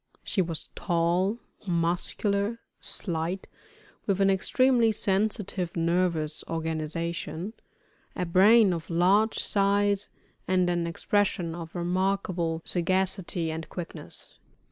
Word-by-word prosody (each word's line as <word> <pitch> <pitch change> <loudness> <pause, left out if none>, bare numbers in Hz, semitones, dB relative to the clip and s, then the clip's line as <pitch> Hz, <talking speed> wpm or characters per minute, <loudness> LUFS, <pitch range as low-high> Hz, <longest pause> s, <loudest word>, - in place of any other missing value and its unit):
She 195 - 0
was 165 -3 -3
tall, 175 +5 +1 0.3
muscular, 200 +5 0 0.2
slight, 170 +1 -1 0.6
with 195 -2 +1
an 195 0 +4
extremely 240 +4 +3
sensitive 200 -3 -1
nervous 170 -2 0
organization, 165 +3 -3 0.6
a 180 - -1
brain 195 +4 +6
of 165 -2 -5
large 190 +6 +3
size, 200 0 +1 0.4
and 185 -1 +2
an 175 -1 0
expression 175 -1 0
of 165 0 -8
remarkable 175 -2 -1
sagacity 185 -1 0
and 160 0 -6
quickness. 175 -2 -9
180 Hz, 100 wpm, -27 LUFS, 170-200 Hz, 0.6 s, brain